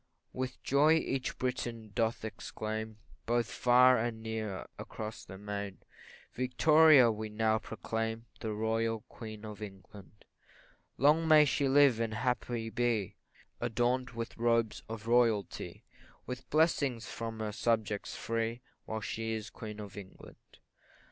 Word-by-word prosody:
With 130 0 -4
joy 145 +3 +4
each 135 -5 -1
Briton 120 -4 -3
doth 110 +2 0
exclaim, 110 0 -5 0.3
Both 120 0 +1
far 125 0 +5
and 110 -1 -3
near 110 -4 -4
across 110 0 -6
the 95 - -10
main, 100 -1 -5 0.6
Victoria 145 0 +6
we 110 0 -5
now 110 +1 +1
proclaim 115 +1 -4
The 110 - -3
Royal 110 +1 0
Queen 110 -2 -9
of 105 -1 -8
England; 100 0 -11 0.7
Long 155 +4 +4
may 155 -1 +8
she 140 0 +1
live, 135 -3 +5
and 115 -1 -1
happy 120 -1 -1
be, 115 -5 0 0.4
Adorn'd 120 +2 0
with 115 0 -5
robes 115 -2 +2
of 110 -1 -6
royalty, 115 -4 +1 0.4
With 125 0 -7
blessings 145 -7 +2
from 115 -1 -5
her 110 -1 -2
subjects 110 -2 -1
free, 115 +1 -2 0.2
While 110 0 -4
she 110 +1 -3
is 110 -1 -5
Queen 105 -1 -8
of 105 -1 -8
England. 95 -2 -13
115 Hz, 130 wpm, -32 LUFS, 110-125 Hz, 0.7 s, may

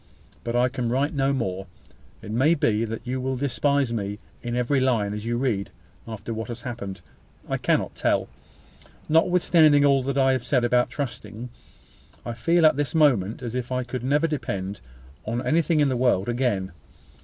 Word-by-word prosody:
But 120 0 -3
I 125 +1 +4
can 125 -2 -3
write 135 +6 0
no 135 -1 +1
more. 95 -8 -2 0.6
It 105 - -7
may 135 +9 +3
be 115 -6 +1
that 115 0 -6
you 130 +1 -2
will 130 +1 -1
despise 140 -1 0
me 100 -2 -3 0.2
in 120 0 -3
every 125 +3 +1
line 115 -6 +1
as 105 +2 -5
you 120 0 0
read: 115 -6 -1 0.4
after 110 0 -6
what 110 0 -5
has 120 -1 -7
happened, 100 -6 -6 0.5
I - - -1
cannot - - 0
tell. - - 0 0.8
Notwithstanding 160 -3 +4
all 135 -2 +4 0.2
I 135 0 +4
have 130 -2 0
said 130 -4 +1
about 125 +1 +2
trusting, 120 -3 -6 0.8
I 120 - -3
feel 165 +8 +2
at 155 - +5
this 145 -2 -2
moment 125 -8 +2
as 120 -2 -4
if 125 0 -4
I 130 0 0
could 125 0 -5
never 145 +5 +2
depend 100 -11 -3 0.4
on 120 +3 -3
anything 165 0 +2
in 145 - +4
this 130 - 0
world 120 -6 +2
again. 120 -6 -1
125 Hz, 180 wpm, -24 LUFS, 115-140 Hz, 0.8 s, at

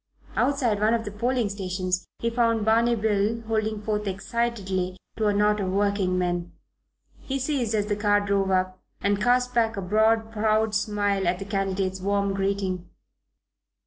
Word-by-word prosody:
Outside 250 -7 +1
one 215 +2 +3
of 230 0 -3
the 205 - -5
polling 240 +2 0
stations 185 -2 -2
he 230 - -1
found 230 -2 +1
Barney 230 +2 +3
Bill 215 +1 0
holding 220 -1 -1
forth 210 -1 -1
excitedly 195 -2 -2 0.2
to 220 -1 +1
a 205 - +3
knot 210 +1 +3
of 190 -2 -1
working 200 -2 +1
men. 175 -1 -1 0.7
He 270 - -3
ceased 260 -5 -1
as 205 -1 +1
the 205 0 -1
car 205 0 +3
drove 200 -1 0
up, 185 0 0 0.2
and 200 0 0
cast 250 0 +2
back 225 -2 +1
a - - -2
broad 220 +3 +2
proud 215 0 +1
smile 205 -3 0
at 175 +1 +1
the 195 - -6
candidate's 195 -2 -1
warm 200 0 0
greeting. 195 -2 -2
205 Hz, 165 wpm, -25 LUFS, 195-225 Hz, 0.7 s, one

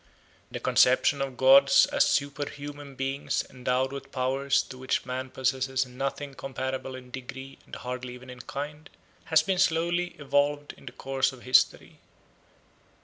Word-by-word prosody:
The - - -5
conception 130 +2 +4
of 135 -2 -3
gods 135 +1 +7
as - - +2
superhuman 145 0 -3
beings 135 +2 -2
endowed 130 +1 -1
with 135 0 -8
powers 135 +1 +1
to 130 - -11
which 130 - -1
man 130 0 -4
possesses 130 0 0
nothing 135 +2 -4
comparable 130 -1 -4
in 125 -1 -11
degree 130 +1 -8
and - - -8
hardly 125 0 -6
even 125 0 -11
in 125 - -11
kind, 150 +2 -6 0.4
has 160 -1 +4
been 185 +2 0
slowly 175 0 +1
evolved 145 +1 0
in - - -19
the - - -5
course 135 0 -1
of 130 -2 -14
history. 130 +1 +2
135 Hz, 145 wpm, -27 LUFS, 130-145 Hz, 0.4 s, gods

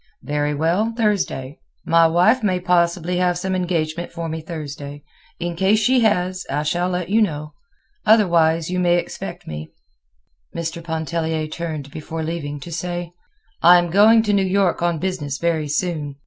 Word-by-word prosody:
"Very 145 +2 -1
well; 180 +9 0
Thursday. 195 - -1 0.3
My 165 0 +5
wife 180 +10 +3
may 185 -4 +1
possibly 175 -1 +1
have 180 -1 +1
some 185 +1 -2
engagement 175 -2 -2
for 170 -1 -5
me 160 0 -4
Thursday. 145 -3 -7 0.4
In 175 0 -3
case 190 +4 +3
she 250 +4 +3
has, 185 -4 +1
I 145 +2 -1
shall 175 +4 0
let 180 -1 -3
you 220 +3 +3
know. 150 -6 -2 0.5
Otherwise, 170 -6 +3
you 180 - -1
may 175 -1 +3
expect 175 - -6
me." 75 0 -7 0.9
Mr. 170 0 -4
Pontellier 160 -1 -2
turned 155 -3 -5
before 160 +2 -5
leaving 150 -3 -4
to 170 - -8
say: 175 0 -4 0.5
"I 175 +1 +8
am 175 -1 0
going 220 +4 +6
to 210 -2 +1
New 200 - +3
York 190 -2 +1
on 170 -1 +1
business 150 -6 -3
very 160 -1 0
soon. 150 -2 -2
170 Hz, 160 wpm, -21 LUFS, 155-185 Hz, 0.9 s, I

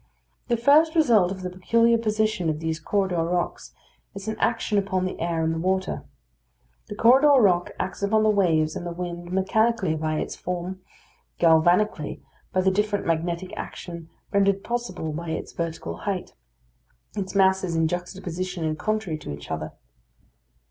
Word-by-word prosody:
The 235 - +1
first 300 +7 +5
result 230 - +4
of 190 -1 -6
the 180 - -2
peculiar 230 +6 +3
position 215 -5 0
of 155 -1 -2
these 160 0 -2
corridor 190 0 0
rocks 175 +1 -2 0.4
is 195 +1 -7
an 220 - -2
action 225 -2 +1
upon 190 -2 -1
the 185 - -4
air 165 -1 -1
and 160 0 +1
the 165 - -3
water. 190 +2 -1 0.8
The 205 - -6
corridor 265 +7 +6
rock 180 -6 +3
acts 185 +1 -3
upon 215 +2 +2
the 215 - +4
waves 160 -6 +2
and - - -4
the 175 - -4
wind 175 0 -6
mechanically 190 0 +1
by 155 0 -1
its - - -3
form; 180 +1 -5 0.6
galvanically, 170 +1 +3 0.3
by 185 - +2
the 190 +1 +3
different 205 +1 0
magnetic 170 +2 -2
action 170 -2 -7 0.2
rendered 200 -1 +2
possible 235 -10 -3
by 170 +2 -5
its 160 - -4
vertical 165 -1 -4
height, 195 -3 -4 0.8
its 195 -1 -4
masses 190 -2 +3
in 165 0 +2
juxtaposition 180 0 -4
and 155 0 -2
contrary 215 -7 -1
to 140 - -7
each 70 0 -8
other. - - -3
185 Hz, 160 wpm, -25 LUFS, 170-210 Hz, 0.8 s, corridor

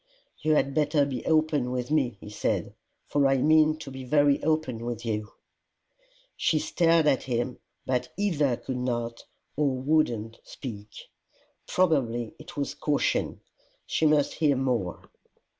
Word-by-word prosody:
"You 155 0 +2
had 140 -1 +1
better 150 -1 +2
be 135 -3 -4
open 155 -5 +2
with 125 +2 -3
me," 130 -8 +1
he 105 - -10
said, 105 - -1 0.3
"for 145 -1 +2
I 135 0 +3
mean 155 +2 +4
to 145 -3 -9
be 130 0 -7
very 145 +2 +3
open 155 -7 0
with 120 -1 -4
you." 105 -1 -2 1.0
She 160 - +1
stared 165 +1 +3
at 140 -3 +3
him, 120 0 -2 0.3
but 125 -1 -1
either 150 - +1
could 130 - -5
not, 120 -2 -3 0.3
or 145 -1 +2
would 145 +4 +2
not 115 -1 -6
speak. 105 -6 -8 0.8
Probably 125 -10 +1
it 155 - -12
was 140 - -2
caution: 145 -2 0 0.4
she 160 - +1
must 150 -2 +3
hear 150 -3 +2
more. 125 -9 -2
135 Hz, 145 wpm, -27 LUFS, 120-155 Hz, 1.0 s, mean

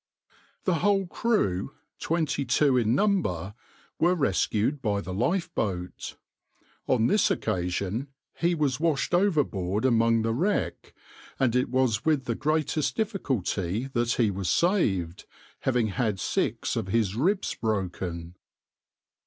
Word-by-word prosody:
The 180 -4 +1
whole 200 -1 +3
crew, 135 - 0 0.2
twenty 155 -4 0
two 135 +2 +3
in 120 -1 +2
number, 120 - 0 0.5
were 175 +2 +3
rescued 130 - 0
by 105 -4 0
the 95 -2 -6
lifeboat. 105 - -2 0.7
On 120 -3 +3
this 205 - +3
occasion 100 +5 -2 0.3
he 170 +1 0
was 145 -5 0
washed 165 0 0
overboard 130 - +1
among 115 -2 +3
the 115 0 0
wreck, 135 - -1 0.4
and 125 -3 +2
it 125 -1 +1
was 125 -4 +1
with 150 -5 +1
the 120 - -1
greatest 155 +2 0
difficulty 130 - -1
that 120 -1 +1
he 110 -4 +2
was 95 -2 -3
saved, 95 - +1 0.3
having 125 -4 +1
had 105 0 -1
six - - -1
of 110 -4 -2
his 105 -1 0
ribs 185 - +1
broken. 90 -5 -3
120 Hz, 125 wpm, -27 LUFS, 100-155 Hz, 0.7 s, whole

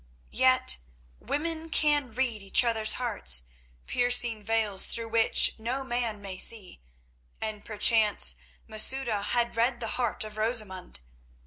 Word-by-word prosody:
Yet 65 -1 +3 0.4
women 325 +2 -4
can 295 -5 +1
read 240 -5 -2
each 195 +5 +3
other's 220 -2 +2
hearts, 205 - -1 0.4
piercing 245 -2 +1
veils 220 -3 -1
through 230 -1 -4
which 225 0 +4
no 250 +5 -3
man 240 -5 -3
may 190 -2 -7
see, 205 - -3 0.6
and 215 -2 -5
perchance 215 0 +4 0.3
Masouda 225 0 -1
had 235 +3 0
read 240 +1 0
the 225 -2 -2
heart 240 -3 -1
of 215 0 -9
Rosamund. 215 - -2
225 Hz, 125 wpm, -27 LUFS, 210-245 Hz, 0.6 s, which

